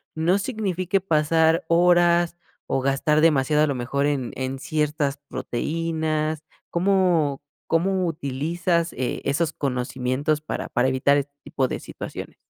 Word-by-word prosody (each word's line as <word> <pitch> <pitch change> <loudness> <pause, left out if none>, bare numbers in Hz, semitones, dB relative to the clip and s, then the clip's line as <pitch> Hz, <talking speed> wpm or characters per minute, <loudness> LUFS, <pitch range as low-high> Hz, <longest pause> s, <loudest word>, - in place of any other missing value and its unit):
no 170 +5 +2
signifique 195 -4 -1
pasar 160 -1 +2
horas 175 0 +4 0.3
o - - 0
gastar 140 +3 +1
demasiado, 150 -1 +3
a - - +3
lo 140 - -1
mejor, 130 +3 -1
en 140 -4 -1
en 130 0 -3
ciertas 150 0 -1
proteínas, 155 +4 -2 0.3
¿cómo 175 -6 +2 0.3
cómo 185 +3 +1
utilizas 165 +4 -1
e 130 0 -3
esos 150 +4 +1
conocimientos 130 +2 -1
para 155 - -5
para 125 +2 +1
evitar 130 +2 +3
este 140 0 -3
tipo 130 -2 -1
de - - -4
situaciones? - - -8
155 Hz, 130 wpm, -24 LUFS, 140-170 Hz, 0.3 s, horas